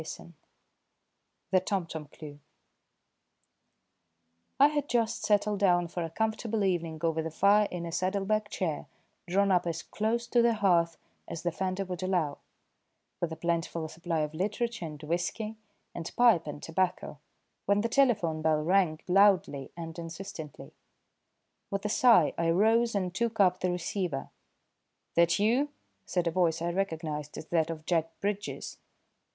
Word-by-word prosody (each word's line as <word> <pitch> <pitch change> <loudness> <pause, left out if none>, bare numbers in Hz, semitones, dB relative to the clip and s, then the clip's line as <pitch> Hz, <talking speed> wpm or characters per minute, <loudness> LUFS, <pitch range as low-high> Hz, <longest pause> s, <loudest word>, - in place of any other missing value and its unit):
III 170 +2 -9 1.2
THE 185 - +5
TOMTOM 170 -5 -3
CLUE 145 0 -11 2.2
I 280 - +8
had 295 -1 -2
just 230 -2 0
settled 205 -1 +2
down 175 -3 +3
for 175 - -4
a 165 - -4
comfortable 220 +2 -1
evening 170 -4 -1
over 165 -1 +1
the 160 - -3
fire 200 +6 +4
in 175 -1 -5
a 170 - -5
saddle 185 +3 -1
bag 215 +1 0
chair 170 -8 -3 0.4
drawn 200 +2 +2
up 180 -1 +2
as 165 -1 -3
close 230 +3 -1
to 240 - +4
the 235 -1 +3
hearth 175 -5 +2 0.3
as 165 -1 -6
the 175 - 0
fender 190 +2 -2
would 180 -1 -5
allow, 180 -6 0 0.8
with 170 - -2
a - - -4
plentiful 165 0 -2
supply 165 0 -2
of 150 0 -2
literature 210 +2 -2
and 150 -1 -10
whisky, 175 +7 -2 0.4
and 170 -1 -6
pipe 230 -10 +4
and 150 0 -7
tobacco, 175 -3 -1 0.5
when 200 +1 +3
the 230 - 0
telephone 220 -11 +2
bell 155 -1 +2
rang 170 -2 +2
loudly 190 -6 +3
and 165 0 -7
insistently. 165 -3 -8 1.0
With 200 +1 -3
a - - +1
sigh 230 -7 +5
I 165 0 +2
rose 225 +6 +3
and 185 -3 -1
took 230 +2 -1
up 185 -2 +4
the 185 - 0
receiver. 175 -4 -3 0.8
"That 170 0 +4
you?" 240 +8 +2 0.4
said 180 -2 0
a 170 - +1
voice 165 -2 +1
I 170 +1 -1
recognised 160 -5 -3
as - - -7
that 165 -2 +1
of 160 -1 -6
Jack 165 -2 -1
Bridges. 205 0 -4
180 Hz, 155 wpm, -29 LUFS, 165-205 Hz, 2.2 s, I